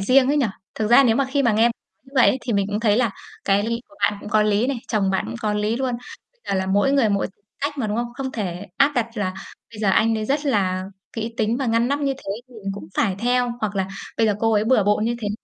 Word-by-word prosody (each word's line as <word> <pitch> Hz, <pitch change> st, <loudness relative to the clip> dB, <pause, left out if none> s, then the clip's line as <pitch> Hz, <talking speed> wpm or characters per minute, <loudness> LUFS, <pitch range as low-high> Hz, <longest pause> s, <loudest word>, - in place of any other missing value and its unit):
riêng 255 Hz, +6 st, +4 dB
ấy 295 Hz, -, +2 dB
nhỉ. 275 Hz, -5 st, +3 dB, 0.3 s
Thực 215 Hz, -1 st, -1 dB
ra 275 Hz, +3 st, +8 dB
nếu 225 Hz, -1 st, +3 dB
mà 275 Hz, -, +2 dB
khi 280 Hz, 0 st, +2 dB
mà 235 Hz, -4 st, +3 dB
nghe 220 Hz, +2 st, +3 dB
nói 235 Hz, 0 st, +4 dB, 0.3 s
như 270 Hz, -, -20 dB
vậy 260 Hz, -, +6 dB
ấy 265 Hz, -, +2 dB
thì 240 Hz, -, -3 dB
mình 200 Hz, -1 st, +1 dB
cũng 205 Hz, +2 st, -2 dB
thấy 215 Hz, -2 st, +3 dB
là 240 Hz, -4 st, +2 dB, 0.3 s
cái 215 Hz, +4 st, +1 dB
của 300 Hz, -, -20 dB
bạn 210 Hz, -, +3 dB
cũng -, -, -8 dB
có 215 Hz, -2 st, +3 dB
lý 210 Hz, +2 st, +2 dB
này, 265 Hz, -2 st, -1 dB
chồng 200 Hz, -4 st, +1 dB
bạn 190 Hz, -, 0 dB
cũng -, -, -6 dB
có 210 Hz, -1 st, 0 dB
lý 210 Hz, +2 st, 0 dB
luôn. 255 Hz, -2 st, -1 dB, 0.4 s
Bây -, -, -41 dB
giờ 195 Hz, -, +1 dB
là 190 Hz, -, -1 dB
mỗi 205 Hz, +8 st, +2 dB
người 265 Hz, -6 st, +4 dB
mỗi 200 Hz, -1 st, +1 dB, 0.3 s
cách 290 Hz, 0 st, -2 dB
mà, 225 Hz, -, 0 dB
đúng 210 Hz, +1 st, -2 dB
không? 240 Hz, 0 st, -2 dB
Không 265 Hz, 0 st, -4 dB
thể 190 Hz, -3 st, -4 dB
áp 280 Hz, +1 st, +4 dB
đặt 235 Hz, -2 st, +1 dB
là 185 Hz, -3 st, -1 dB, 0.4 s
bây 215 Hz, -, -11 dB
giờ 205 Hz, -, +2 dB
anh 225 Hz, +3 st, +3 dB
đấy 215 Hz, -1 st, -2 dB
rất 285 Hz, +4 st, -1 dB
là 185 Hz, -7 st, +1 dB, 0.3 s
kỹ 225 Hz, 0 st, -4 dB
tính 220 Hz, +2 st, +1 dB
và 265 Hz, -2 st, -2 dB
ngăn 230 Hz, +2 st, +2 dB
nắp 285 Hz, +1 st, 0 dB
như 275 Hz, -1 st, +1 dB
thế 195 Hz, -7 st, -6 dB, 0.2 s
mình 210 Hz, -5 st, -6 dB
cũng 175 Hz, -5 st, -9 dB
phải 195 Hz, -4 st, +1 dB
theo 245 Hz, +1 st, +1 dB
hoặc 210 Hz, -2 st, -2 dB
là 190 Hz, 0 st, 0 dB, 0.3 s
bây 225 Hz, -, +3 dB
giờ 210 Hz, -, +2 dB
cô 225 Hz, 0 st, +2 dB
ấy 210 Hz, 0 st, +3 dB
bừa 225 Hz, -4 st, +3 dB
bộn 210 Hz, +1 st, +2 dB
như 235 Hz, +1 st, 0 dB
thế 210 Hz, -, -2 dB
225 Hz, 290 wpm, -22 LUFS, 205-255 Hz, 0.4 s, ra